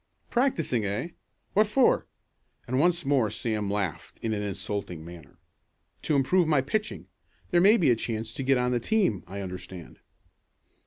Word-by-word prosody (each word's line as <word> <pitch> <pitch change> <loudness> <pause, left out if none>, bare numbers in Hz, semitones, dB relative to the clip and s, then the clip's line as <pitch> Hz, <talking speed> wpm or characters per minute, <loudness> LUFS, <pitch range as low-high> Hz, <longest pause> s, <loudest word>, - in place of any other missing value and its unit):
"Practicing, 170 - +1
eh? 100 - -2 0.4
What 215 +1 +4
for?" 250 +4 +3 0.6
and 130 +2 -1
once 175 0 +2
more 135 -6 +2
Sam 110 -1 -2
laughed 100 -5 -3
in 110 -1 0
an 105 - -2
insulting 100 -4 -4
manner. 85 -4 -12 0.6
"To 150 - 0
improve 165 +6 +3
my 150 -4 +3
pitching. 210 +11 -3 0.5
There 175 -2 +4
may 210 +5 +6
be 155 - +4
a - - +4
chance 110 -1 -4
to 140 - -5
get 135 0 +3
on 125 0 +1
the 120 - +1
team, 155 - +1
I 100 +2 -6
understand." 90 -2 -8
120 Hz, 160 wpm, -27 LUFS, 100-165 Hz, 0.6 s, may